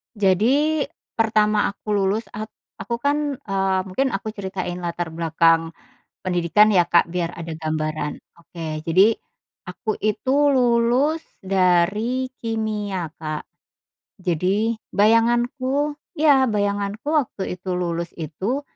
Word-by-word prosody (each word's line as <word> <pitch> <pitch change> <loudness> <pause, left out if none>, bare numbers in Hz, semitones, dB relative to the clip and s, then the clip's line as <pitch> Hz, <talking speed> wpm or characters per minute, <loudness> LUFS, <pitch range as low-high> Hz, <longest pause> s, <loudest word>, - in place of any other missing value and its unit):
Jadi 245 - +3 0.4
pertama 215 -1 +3
aku 205 +1 -6
lulus 205 +2 +1
at 215 +1 -5 0.3
aku 235 - -3
kan, 290 0 +1
eee, 195 -4 0
mungkin 265 +9 0
aku 215 +2 -4
ceritain 190 -3 -5
latar 170 -1 -3
belakang 165 0 +2 0.4
pendidikan 180 +3 +3
ya 190 -5 +4
Kak 170 0 +3
biar 170 -1 -2
ada 165 -2 -7
gambaran. 155 -1 -3 0.2
Oke. 160 -2 -7
Jadi, 190 +7 +4 0.5
aku 195 +4 -4
itu 235 +5 +1 0.2
lulus 250 +5 +2 0.2
dari 195 +7 +1 0.2
kimia 210 -5 -2
Kak, 155 -1 -5 0.8
jadi 190 +6 +1 0.2
bayanganku 240 +6 +2 0.2
iya 285 -4 +5
bayanganku 205 +1 -1
waktu 240 -12 -1
itu 185 - -8
lulus 170 -1 -2
itu, 185 - -3
200 Hz, 110 wpm, -22 LUFS, 175-230 Hz, 0.8 s, iya